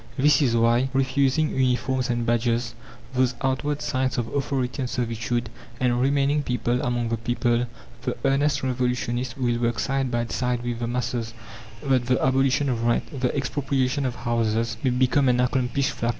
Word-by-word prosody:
This 145 +1 +4
is 120 -5 +2
why, 120 +3 +3
refusing 135 +3 +2
uniforms 130 0 +1
and 120 -1 0
badges 115 0 0 0.4
those 130 -1 +2
outward 145 +3 -1
signs 130 -1 -1
of 115 -2 -1
authority 135 -2 -1
and 125 - -2
servitude 120 0 -2 0.3
and 125 -1 +1
remaining 140 +2 +2
people 125 -2 -1
among 120 -1 -1
the 115 - 0
people, 120 +1 0 0.3
the 125 -1 -3
earnest 140 +2 +2
revolutionists 125 -1 -1
will 120 -2 0
work 120 -1 0
side 135 -1 0
by 120 -1 0
side 125 +1 -1
with 120 -1 -3
the 120 - -2
masses, 120 -1 -3 0.5
that 130 -3 +1
the 130 0 +2
abolition 135 +2 +2
of 120 -3 -1
rent, 120 +3 0
the 125 +3 0
expropriation 135 0 0
of 125 - -4
houses, 115 0 0
may 135 - +2
become 130 +2 +3
an 125 0 +2
accomplished 130 +2 +1
fact. 115 - -2
125 Hz, 165 wpm, -24 LUFS, 120-135 Hz, 0.5 s, This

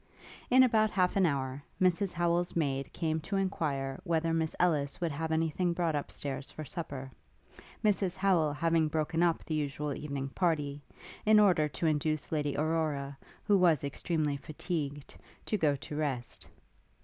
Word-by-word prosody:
In 255 +1 +7
about 220 -3 +4
half 185 -3 +1
an 190 -3 +4
hour, 135 -2 -2 0.2
Mrs 185 +1 +2
Howel's 175 0 0
maid 140 -4 -1
came 160 -2 -1
to 185 +6 -4
enquire 145 -8 -1
whether 165 -2 0
Miss 160 -1 0
Ellis 150 -6 +1
would 170 -2 -1
have 160 +3 -3
any 160 0 +1
thing 175 +2 0
brought 170 -2 0
up 145 - -3
stairs 140 -1 -4
for 155 - -7
supper; 135 -6 -6 0.7
Mrs 195 -3 +2
Howel 185 -6 +2
having 165 +1 +2
broken 160 +2 -1
up 170 -2 +2
the 160 - -3
usual 150 -1 -2
evening 140 -1 -4
party, 150 -3 0 0.4
in 215 0 +6
order 180 -7 +4
to 145 +3 -4
induce 155 -1 0
Lady 145 -3 -1
Aurora, 150 -3 -1 0.3
who 205 - +3
was 165 -6 +4
extremely 150 +1 -1
fatigued, 145 -1 -5 0.3
to - - 0
go 155 -7 +2
to 145 +2 -7
rest. 140 -5 -3
160 Hz, 160 wpm, -31 LUFS, 145-175 Hz, 0.7 s, In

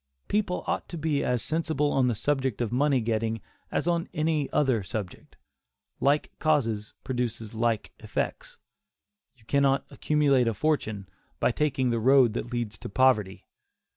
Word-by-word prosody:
People 200 -3 0
ought - - -2
to 170 - -5
be 155 -2 0
as 125 -2 0
sensible 155 -2 0
on 130 -2 +3
the 120 - +1
subject 135 -1 -1
of 120 -2 -1
money 135 +1 +2
getting 110 0 -1 0.3
as - - -1
on 170 -1 0
any 155 -2 0
other 130 -7 +2
subject. 95 0 -7 0.6
Like 145 +2 +2
causes 115 -9 0
produce 120 -4 -3
like 115 -1 -1
effects. - - -4 0.8
You 115 -4 -25
cannot 140 +1 +2
accumulate 140 -5 +2
a 115 - 0
fortune 110 -8 -1 0.3
by - - +3
taking 130 -2 0
the 115 - 0
road 130 -1 +5
that 120 +1 -4
leads 120 -3 -3
to - - -7
poverty. 105 -5 +2
130 Hz, 150 wpm, -27 LUFS, 115-150 Hz, 0.8 s, road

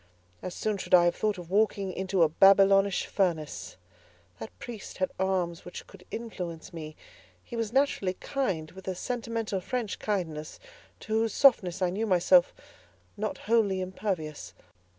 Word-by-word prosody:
As 185 - -6
soon 215 -2 -1
should 185 - +3
I 175 -1 +6
have 175 - +2
thought 210 -2 0
of 175 -1 -10
walking 200 -2 +1
into 190 -1 +1
a - - +6
Babylonish 195 +3 +5
furnace. 155 - -2 0.6
That 110 - -6
priest 230 -5 -8
had 185 - 0
arms 185 -3 -1
which 180 - -9
could 185 -2 -16
influence 185 -6 -6
me: 155 -2 -7 0.5
he 240 - -9
was 225 -2 -2
naturally 250 -8 +1
kind, 180 - -2
with 190 +1 -13
a 190 - -2
sentimental 230 -3 -3
French 240 +1 -3
kindness, 160 -7 -3 0.4
to 215 - -5
whose 225 -1 +1
softness 195 -9 +4
I 180 - +2
knew 215 +4 -2
myself 180 -1 +5 0.6
not 215 0 -3
wholly 210 -3 +2
impervious. 165 - -4
190 Hz, 150 wpm, -28 LUFS, 175-215 Hz, 0.6 s, I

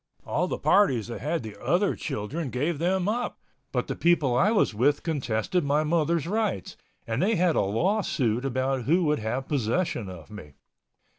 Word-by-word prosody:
All - - 0
the - - -3
parties 130 - +3
that 115 - -6
had 155 +1 -1
the 110 -2 -9
other 175 +10 +1
children 135 +3 -4
gave 145 +5 -1
them 185 +2 +1
up, 240 +3 -2 0.3
but - - -1
the - - -4
people 160 -7 +2
I 190 +11 +4
was 215 - +2
with 140 +7 +2
contested 145 - -1
my 145 +2 +2
mother's 165 0 +1
rights, 205 - -2 0.3
and 115 +4 -2
they 215 +4 +2
had 180 -2 +2
a - - +3
law 170 - +1
suit 120 - 0
about 130 -1 -1
who 175 +5 +3
would 150 -1 +1
have 120 +5 -3
possession 120 - -1
of 90 +1 -11
me. 75 -9 -10
145 Hz, 180 wpm, -26 LUFS, 120-175 Hz, 0.3 s, I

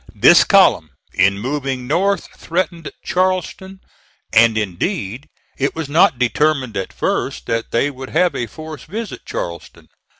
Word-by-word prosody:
This - - +7
column, 80 - +4 0.2
in 100 0 +3
moving 130 +2 -3
north, 190 +9 0
threatened 170 -2 -3
Charleston, 185 +1 -2 0.5
and, 115 0 +5
indeed, 110 - -3 0.3
it 140 +1 0
was 160 -3 -4
not 155 -2 +4
determined 130 0 +1
at 95 -1 -3
first - - -2
that 115 - -2
they 135 +5 +1
would 130 -1 -9
have 175 +2 +2
a 120 - -3
force 155 +5 -9
visit 215 +5 -7
Charleston. 85 -1 -7
145 Hz, 135 wpm, -19 LUFS, 115-175 Hz, 0.5 s, This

